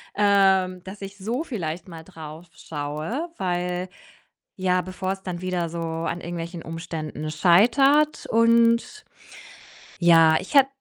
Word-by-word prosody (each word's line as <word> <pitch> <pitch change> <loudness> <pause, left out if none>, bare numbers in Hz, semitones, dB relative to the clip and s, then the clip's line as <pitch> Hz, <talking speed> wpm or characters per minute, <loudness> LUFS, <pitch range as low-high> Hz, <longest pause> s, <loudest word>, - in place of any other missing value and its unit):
ähm, 190 -3 +3
dass 190 +2 -10
ich 195 +1 -8
so 230 +9 -3
vielleicht 175 - -5
mal 165 -1 -10
drauf 160 -1 -11
schaue, 155 - -5
weil, 180 0 -2 0.7
ja, 185 -1 +1
bevor 185 +1 -4
es 195 0 -5
dann 175 -2 -5
wieder 180 -2 -2
so 170 +1 -6
an 165 +1 -3
irgendwelchen 170 0 -6
Umständen 165 -2 -6
scheitert 245 - +3
und 230 - +3 1.0
ja, 165 -2 +6
ich 190 - -10
hät 275 -2 +7
180 Hz, 130 wpm, -24 LUFS, 165-205 Hz, 1.0 s, hät